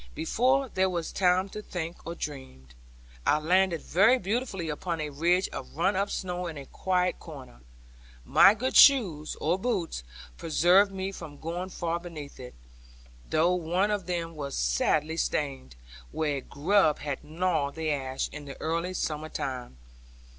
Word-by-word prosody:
Before 260 +10 +2
there 190 -4 +1
was 170 -3 -3
time 185 0 +2
to 210 - -7
think 170 -4 -6
or 170 - -4
dream, 130 - -7 0.5
I 150 - +3
landed 175 +2 +2
very 205 +9 +4
beautifully 200 -4 -2
upon 165 +2 -3
a 150 -1 -3
ridge 175 +6 +2
of - - -8
run 195 - +2
up 200 +2 0
snow 180 -1 -3
in 160 -3 -6
a 140 - -8
quiet 180 +4 0
corner. 135 - -11 0.6
My 200 - +7
good 255 +4 -2
shoes, 185 - +5
or 170 +5 +1
boots, 190 - -2 0.4
preserved 180 +5 +4
me 190 0 -4
from 160 -6 -9
going 175 +4 -4
far 170 -2 -2
beneath 160 -5 -9
it; 125 -1 -10 0.7
though 165 +3 +3
one 180 +4 0
of 200 -4 -2
them 170 -2 -3
was 140 -2 -5
sadly 150 - +1
strained, 135 - -2 0.4
where 150 -3 -1
a - - -4
grub 155 +4 +2
had 145 -2 -5
gnawed 160 -3 -1
the 160 -1 -1
ash, 135 -2 -2
in 150 0 -8
the 140 - -9
early 170 +3 -2
summer 155 -2 -3
time. 125 - -5
170 Hz, 160 wpm, -28 LUFS, 150-185 Hz, 0.7 s, My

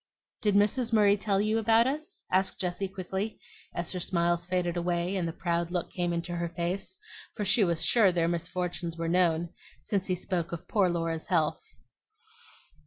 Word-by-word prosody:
"Did 205 -2 +2
Mrs. 220 +4 +2
Murray 205 -2 +5
tell 200 -1 0
you 215 +2 +1
about 225 +1 +4
us?" 305 +8 -4
asked 190 +1 +1
Jessie 180 +2 -1
quickly, 190 +3 -4 0.3
as 170 0 -3
her 185 - -3
smiles 175 0 0
faded 180 -1 0
away 175 +1 -1
and 180 -3 -1
the - - -2
proud 170 0 -1
look 175 -1 -3
came 175 -2 -1
into 170 +1 -3
her 170 0 -2
face; 175 - -3 0.4
for 210 - -2
she 210 +3 +5
was 170 -3 +2
sure 215 -6 +6
their 170 -2 +1
misfortunes 170 0 -3
were 165 0 -2
known, 170 -1 +2 0.3
since 200 -3 -1
he 185 - +1
spoke 175 -2 -3
of 170 -1 -6
poor 195 -4 +2
Laura's 165 -2 -2
health. 160 -4 +1
180 Hz, 175 wpm, -29 LUFS, 170-200 Hz, 0.4 s, sure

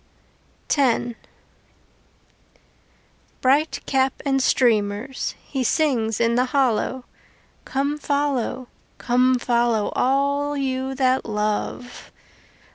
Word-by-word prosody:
X 255 -4 +2 2.3
Bright 285 +5 +2
cap 265 -1 +1
and 270 -1 +1
streamers, 225 0 +1
He 265 -2 -3
sings 235 -6 +1
in 230 0 +2
the 250 +2 +2
hollow: 260 -1 0 0.6
Come 280 +2 -1
follow, 275 -3 -1 0.3
come 255 +1 +2
follow, 235 -3 +1
All 280 +2 +1
you 265 -1 -2
that 260 -1 +2
love. 215 +3 -3
260 Hz, 85 wpm, -22 LUFS, 240-275 Hz, 2.3 s, X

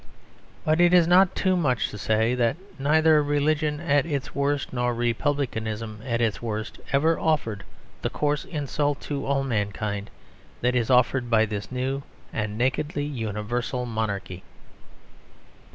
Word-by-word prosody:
But 155 +2 +3
it 175 +1 +6
is 175 -2 +6
not 180 +2 +5
too 185 -1 +2
much 140 -9 +1
to 105 - -7
say 110 +3 +2
that 120 +2 +1 0.2
neither 155 +2 +4
religion 150 +1 +1
at 145 -4 +2
its 145 -5 -3
worst 140 -1 -1
nor 125 -1 0
republicanism 115 -3 -2
at 120 -2 -1
its 115 -3 0
worst 110 -1 -4
ever 160 +4 +3
offered 115 -11 0 0.4
the - - -1
coarse 145 0 0
insult 145 -2 -1
to 140 -2 -4
all 135 0 +1
mankind 105 -3 -2 0.5
that 125 +1 +2
is 120 -3 0
offered 125 0 +3
by 110 -1 +4
this 105 0 -5
new 130 +2 -2 0.3
and 105 -1 -2
nakedly 145 +4 0
universal 120 0 -3
monarchy. 100 -5 -3
130 Hz, 140 wpm, -25 LUFS, 110-145 Hz, 0.5 s, it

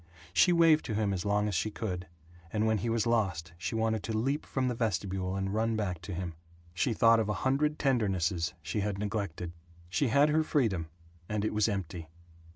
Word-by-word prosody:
She 180 - +5
waved 165 -2 +5
to 110 - -2
him 105 -2 +1
as 90 0 -3
long 105 +1 +2
as 105 - -2
she 95 +5 0
could, 95 -4 -4 0.4
and 110 0 +1
when 110 -1 +2
he 115 - -2
was 115 -1 +1
lost 95 -8 0
she 85 +6 -4
wanted 110 -1 +1
to 110 +1 -1
leap 135 +6 -1
from 130 -1 0
the 125 - 0
vestibule 95 -4 -1
and 95 0 -2
run 110 +1 +1
back 95 -6 -2
to 100 - -7
him. 90 -1 -4 0.4
She 90 +8 +1
thought 115 +1 +5
of 110 -2 0
a - - +1
hundred 150 +3 +2
tendernesses 95 - +1
she 90 +7 -2
had 100 -1 -1
neglected. 100 -5 -3 0.4
She 130 +10 +1
had 140 +5 +4
her 155 +1 +3
freedom, 110 - 0 0.4
and 105 0 -1
it - - -1
was 105 +1 +2
empty. 90 -5 -4
105 Hz, 205 wpm, -30 LUFS, 95-115 Hz, 0.4 s, She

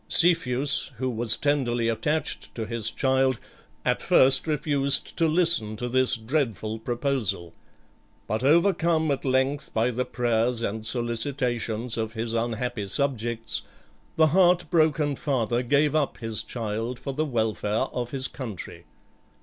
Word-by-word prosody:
Cepheus, 140 -6 +3
who 130 +1 -2
was 115 -1 +1
tenderly 125 -5 0
attached 150 +7 -2
to 115 - -4
his 115 -1 -2
child, 130 +1 +1 0.5
at - - +1
first 135 +4 +5
refused 145 -2 +2
to 165 - +2
listen 160 -10 +2
to 120 +3 -4
this 130 +1 +2
dreadful 115 - -2
proposal; 120 - -2 0.7
but 110 +3 -3
overcome 165 0 +3
at 135 - -2
length 130 +2 0
by 115 +3 +2
the 125 +2 -1
prayers 120 -1 0
and 110 +1 -3
solicitations 120 -1 -2
of 110 0 -3
his 115 0 -3
unhappy 115 -2 -2
subjects, 120 -1 -1 0.5
the 160 - +5
heart 180 -1 +3
broken 155 -3 +2
father 120 -4 -1
gave 145 +4 +2
up 150 -3 0
his 115 -2 -2
child 115 +1 -4
for 135 - -6
the 150 +3 -1
welfare 110 -5 -1
of 120 -1 -3
his 130 0 -2
country. 115 -9 -8
125 Hz, 135 wpm, -25 LUFS, 115-145 Hz, 0.7 s, first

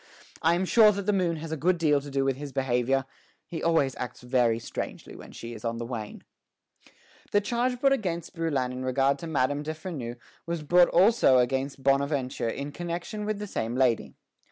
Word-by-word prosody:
I 165 +1 +4
am 185 +2 0
sure 215 +2 +6
that 200 0 -3
the 210 - +2
moon 180 -4 +1
has 160 0 -7
a - - 0
good 175 +4 +1
deal 150 -4 +2
to 145 - -9
do 135 0 0
with 135 -1 +1
his 145 +1 -7
behavior; 130 0 +1 0.4
he 165 - -6
always 160 -6 +2
acts 125 -1 -6
very 125 -2 +2
strangely 115 - -6
when - - -11
she 115 0 -8
is 110 - -10
on 115 0 -2
the 115 - -4
wane." 115 -3 -6 1.1
The 205 - +4
charge 240 +4 -1
brought 275 +1 +4
against 175 -9 -3
Brouillan 145 -7 -1
in 125 0 -5
regard 135 +2 +1
to 170 - -6
Madame 145 -2 0
de 155 +1 -4
Freneuse 140 -8 -6 0.3
was 170 -2 -3
brought 175 +3 +5
also 190 - +5
against 135 +2 0
Bonaventure 135 -3 +1
in 140 +5 -4
connection 175 +6 -5
with 215 -1 -1
the 210 - -5
same 115 - -3
lady. 125 -3 +1
145 Hz, 200 wpm, -27 LUFS, 130-175 Hz, 1.1 s, sure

